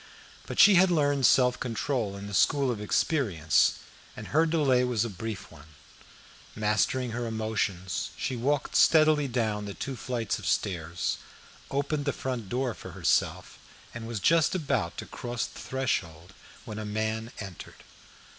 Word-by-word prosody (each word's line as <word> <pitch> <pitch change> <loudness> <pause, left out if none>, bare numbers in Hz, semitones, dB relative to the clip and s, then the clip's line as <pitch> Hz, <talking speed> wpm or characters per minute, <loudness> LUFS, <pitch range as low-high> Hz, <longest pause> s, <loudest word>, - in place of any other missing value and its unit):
But - - -5
she 205 - +9
had 190 - +4
learned 145 -6 +3
self 125 -1 +4
control 115 -4 -2
in 100 - -8
the 100 - -7
school 135 +6 +3
of 110 -3 -4
experience, 105 - +2 0.4
and - - -8
her 160 +2 +3
delay 140 -6 +3
was 120 -3 0
a 115 - -4
brief 105 +1 -6
one. 80 -1 -16 0.8
Mastering 110 +4 +1
her 120 +1 -3
emotions, 105 -5 -2
she 130 - -2
walked 135 +3 -1
steadily 155 -2 +5
down 110 -4 -1
the 100 - -6
two 135 0 -5
flights 120 -2 -3
of - - -6
stairs, 85 -3 -1 0.5
opened 140 +1 -1
the 140 - 0
front 125 -6 -4
door 125 +1 -1
for - - -10
herself, - - 0 0.3
and 115 -1 -7
was 115 -2 -4
just 165 - +3
about 160 -6 -1
to - - -5
cross 120 -1 -4
the - - -11
threshold 95 -10 -3 0.3
when 110 -1 -6
a - - -4
man 110 +2 -2
entered. 95 -5 -9
115 Hz, 155 wpm, -28 LUFS, 105-135 Hz, 0.8 s, she